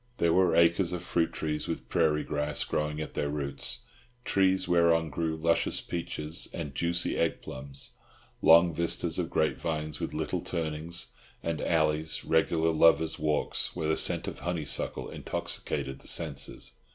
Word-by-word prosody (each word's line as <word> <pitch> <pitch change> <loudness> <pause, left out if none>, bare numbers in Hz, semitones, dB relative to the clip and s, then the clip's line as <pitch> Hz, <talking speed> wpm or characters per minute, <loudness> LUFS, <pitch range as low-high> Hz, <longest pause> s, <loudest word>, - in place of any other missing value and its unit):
There 85 -1 +2
were 90 -1 +4
acres 85 +1 +4
of 90 -1 -4
fruit 85 -2 0
trees, 75 -1 -3
with - - -4
prairie 80 -3 +2
grass 75 -1 -1
growing 75 0 -2
at 75 - -5
their 75 - -1
roots, 75 - -3 0.4
trees 95 -1 +2
whereon 85 -2 +3
grew 80 +2 -1
luscious 85 +1 +1
peaches 80 -2 -2
and 75 -5 -5
juicy 85 +4 0
egg 85 - 0
plums; 65 -1 -7 0.5
long 85 +1 +6
vistas 85 +2 0
of - - -1
grapevines, 75 -1 -1
with - - -4
little - - -2
turnings 80 0 -3 0.3
and 85 -2 -2
alleys, 80 -1 0
regular 80 0 +2
lovers' 80 0 +4
walks, 75 -1 -1
where 80 -3 -2
the 80 - +3
scent - - +2
of - - -5
honeysuckle 85 -5 -1
intoxicated 65 0 -3
the - - -11
senses. 70 -5 0
80 Hz, 150 wpm, -29 LUFS, 75-85 Hz, 0.5 s, long